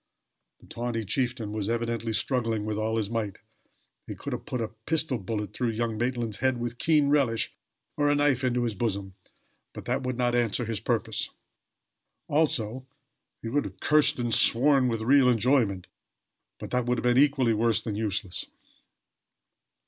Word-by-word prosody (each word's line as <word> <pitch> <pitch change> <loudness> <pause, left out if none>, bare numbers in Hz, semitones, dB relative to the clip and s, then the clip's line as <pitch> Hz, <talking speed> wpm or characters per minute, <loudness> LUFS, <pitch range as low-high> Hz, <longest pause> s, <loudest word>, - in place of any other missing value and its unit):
The - - -17
tawny 115 -1 -3
chieftain 120 0 -1
was 105 -1 -2
evidently 115 -1 -1
struggling 115 -2 0
with 110 0 -2
all 110 +1 -1
his 110 -3 0
might. 110 -3 -3 0.7
He - - -5
could - - -6
have - - -6
put 125 - -3
a 115 -2 -2 0.2
pistol 155 -5 +1
bullet 105 +1 -4
through 125 -2 -1
young 115 -1 -1
Maitland's 120 -2 -2
head 130 -1 +1
with 120 0 -4
keen 150 -3 +3
relish 130 -7 +2 0.4
or 145 -1 +2
a 145 - +3
knife 145 -3 +2
into 125 -1 +1
his 115 -2 -1
bosom; 100 -3 -3 0.6
but - - -9
that 130 +3 -1
would 130 -2 -3
not 120 -1 +1
answer 120 0 +1
his 115 -2 -3
purpose. 110 -2 -1 1.0
Also, 130 -5 0 0.6
he 115 - -3
could 145 +2 +1
have - - -9
cursed 150 -1 +3
and 120 -2 -1
sworn, 135 +3 +4
with 115 -2 -1
real 130 +2 +5
enjoyment; 115 -5 +2 0.7
but - - -8
that 125 -1 0
would 125 0 +1
have - - -3
been 125 +1 +4
equally 135 -5 +2
worse 115 +1 +1
than 110 - -3
useless. 105 -3 -2
120 Hz, 170 wpm, -27 LUFS, 110-130 Hz, 1.0 s, real